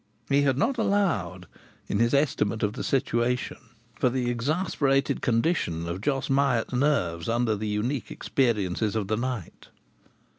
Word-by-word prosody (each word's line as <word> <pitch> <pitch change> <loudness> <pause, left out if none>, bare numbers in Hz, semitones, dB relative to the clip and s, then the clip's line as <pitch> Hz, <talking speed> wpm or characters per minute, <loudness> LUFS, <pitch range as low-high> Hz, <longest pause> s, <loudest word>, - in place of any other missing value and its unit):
He 140 0 +4
had 135 -2 +2
not 245 - +1
allowed, 165 - 0 0.4
in 100 - -1
his 115 0 +3
estimate 115 -7 +1
of 105 0 +1
the - - -5
situation, 125 -2 0 0.3
for 125 +2 +1
the 125 -1 -1
exasperated 140 +1 0
condition 115 - 0
of 85 +3 -4
Jos 135 +2 -1
Hyatt's 135 -4 +1
nerves 120 - +1
under 115 -1 +1
the 105 +1 -4
unique 115 +5 -2
experiences 110 -4 0
of 105 -3 -2
the 110 - +1
night. 120 -6 -5
120 Hz, 145 wpm, -26 LUFS, 105-140 Hz, 0.4 s, He